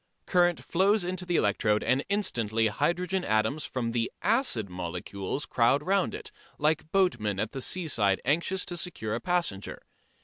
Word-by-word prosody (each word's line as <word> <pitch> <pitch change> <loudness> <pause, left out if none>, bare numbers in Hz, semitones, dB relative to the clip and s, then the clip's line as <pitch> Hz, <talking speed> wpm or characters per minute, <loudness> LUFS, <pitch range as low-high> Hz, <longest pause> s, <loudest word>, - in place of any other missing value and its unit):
Current 175 -2 +2
flows 195 +3 +2
into 180 0 -2
the 175 - 0
electrode 105 -2 +2
and 130 +4 +2
instantly 115 - +1
hydrogen 180 - 0
atoms 110 +6 +1
from 120 -3 -2
the 115 -1 -1
acid 220 - +1
molecules 90 +7 -4
crowd 125 +5 +2
round 195 +1 +1
it, - - -8 0.3
like 155 +1 0
boatmen 115 - +1
at 110 +1 -1
the 135 - -5
seaside 115 - +1
anxious 170 +7 0
to 175 - -5
secure 165 - -3
a 115 - -1
passenger. 175 - -2
140 Hz, 150 wpm, -28 LUFS, 110-180 Hz, 0.3 s, Current